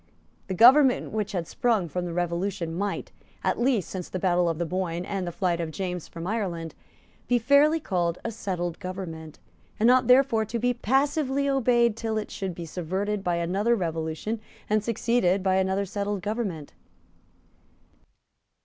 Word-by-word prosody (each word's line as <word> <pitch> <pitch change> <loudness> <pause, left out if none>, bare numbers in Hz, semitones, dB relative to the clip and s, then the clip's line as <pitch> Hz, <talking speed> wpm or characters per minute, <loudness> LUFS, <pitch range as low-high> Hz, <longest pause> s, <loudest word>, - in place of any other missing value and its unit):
The 190 - -3
government 255 +5 +6
which 215 -2 -2
had 175 -4 -2
sprung 225 -8 +1
from 180 +3 -3
the 175 - -4
Revolution 175 0 -2
might, 200 +3 -3 0.3
at - - 0
least 240 -8 +2
since 185 -2 -6
the - - -3
battle 180 -1 +2
of 165 - -2
the 170 - -1
Boyne 175 0 -2
and 195 -3 -3
the - - -2
flight 170 -1 0
of 165 - -3
James 180 0 -4
from 165 0 -8
Ireland, 180 -6 -3 0.5
be 245 - +3
fairly 285 +6 +4
called 175 - -1
a 230 - -1
settled 175 -6 -4
government, 175 -5 -7 0.4
and 230 +3 +5
ought 255 -1 +4
therefore 250 -3 +5
to 220 +2 -3
be 245 +2 +1
passively 275 +3 +1
obeyed 240 -4 +3
till 225 -1 -2
it 215 - -4
should 190 -3 -4
be 170 - -6
subverted 190 +5 -3
by 175 -2 0
another 195 +7 +1
revolution 165 +4 -3 0.3
and 215 0 +1
succeeded 220 -4 +1
by 190 -1 +2
another 190 +1 +1
settled 200 0 -3
government. 205 -9 -3
195 Hz, 165 wpm, -26 LUFS, 175-230 Hz, 0.5 s, government